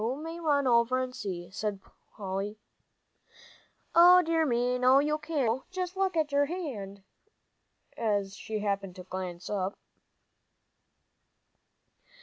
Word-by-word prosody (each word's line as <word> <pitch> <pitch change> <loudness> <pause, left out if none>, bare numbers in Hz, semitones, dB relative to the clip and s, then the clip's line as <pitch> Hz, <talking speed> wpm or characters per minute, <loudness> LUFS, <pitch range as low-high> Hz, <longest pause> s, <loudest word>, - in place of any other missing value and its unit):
"You 240 +4 0
may 325 +3 -7
run 290 -4 +2
over 240 +1 +3
and 255 0 -3
see," 175 -6 -6
said 210 -1 -3 0.4
Polly. 200 +1 -4 1.4
"O 360 +2 +8
dear 325 -1 +1
me, 245 0 +1
no, 255 +1 +6
you 300 +2 +2
can't, 305 -5 -1
Joe, - - -24
just 370 0 -4
look 380 -2 0
at 305 -2 +1
your 285 0 +3
hand!" 220 - -6 0.9
as 205 -3 -1
she 215 +1 -5
happened 200 -3 -2
to 185 - -9
glance 185 -1 -6
up. 195 -1 -2
245 Hz, 130 wpm, -29 LUFS, 200-305 Hz, 1.4 s, O